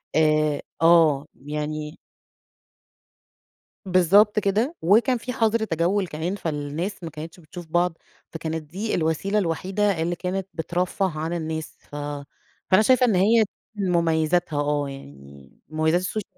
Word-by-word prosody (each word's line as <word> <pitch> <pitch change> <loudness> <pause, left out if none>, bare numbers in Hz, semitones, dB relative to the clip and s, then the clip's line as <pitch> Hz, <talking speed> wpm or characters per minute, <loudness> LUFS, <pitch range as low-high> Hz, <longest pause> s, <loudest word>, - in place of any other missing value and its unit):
آآ 155 -2 +3 0.2
آه، 165 -4 +5
يعني 150 +2 -5 1.9
بالضبط 195 +4 +4
كده. 215 - 0
وكان 235 +8 +4
في 250 +2 -5
حَظْر 225 0 +2
تجوّل 180 +1 0
كمان، 165 +5 -3
فالناس 160 +3 -4
ما 165 - -4
كانتش 160 +4 -9
بتشوف 170 +1 -10
بعض، 175 0 +1 0.3
فكانت 160 -1 -4
دي 190 +9 -3
الوسيلة 170 +6 0
الوحيدة 190 +1 0
اللي 175 +1 -1
كانت 185 +2 -3
بترفَّه 175 0 -1
عن 160 +2 -2
الناس. 160 -1 -4
ف 145 - -13 0.8
فأنا 190 +3 +7
شايفة 255 +2 +4
إن 220 -6 +2
هي 220 +5 +5 0.3
من 195 -3 -1
مميّزاتها 165 -1 +1
آه. 145 -1 0
يعني 70 - -12 0.2
مميّزات 160 +2 +1
السوش 205 +3 -3
170 Hz, 130 wpm, -24 LUFS, 155-195 Hz, 1.9 s, فأنا